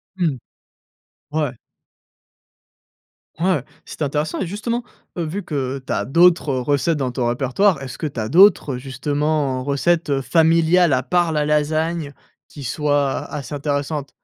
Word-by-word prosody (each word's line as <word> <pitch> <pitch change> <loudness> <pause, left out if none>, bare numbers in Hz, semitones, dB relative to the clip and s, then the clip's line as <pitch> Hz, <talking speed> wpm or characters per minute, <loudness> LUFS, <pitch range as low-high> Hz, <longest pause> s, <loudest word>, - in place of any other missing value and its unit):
Mmh, 165 -8 0 1.0
ouais. 150 -4 0 1.9
Ouais 175 -6 +1 0.2
c'était 155 - -5
intéressant 150 +2 -2
et 190 - -2
justement, 230 +5 -3 0.3
heu, 170 - -1
vu 180 +6 -4
que 135 -4 -3
tu - - -2
as - - -1
d'autres 170 -2 +4
recettes 145 +4 +1
dans 130 -3 -1
ton 125 -1 -1
répertoire, 135 +8 +1
est-ce 130 -2 -8
que 155 - -2
tu 135 -4 -6
as 110 0 -2
d'autres, 170 - +5
justement, 140 +1 -1
recettes 145 +1 +1
familiales, 165 +4 +3
à 130 - +1
part 175 +3 +1
la 150 -1 0
lasagne, 155 +1 0 0.3
qui 145 - -11
soient 145 +1 0
assez 150 0 -6
intéressantes? 145 0 -2
150 Hz, 140 wpm, -20 LUFS, 135-165 Hz, 1.9 s, d'autres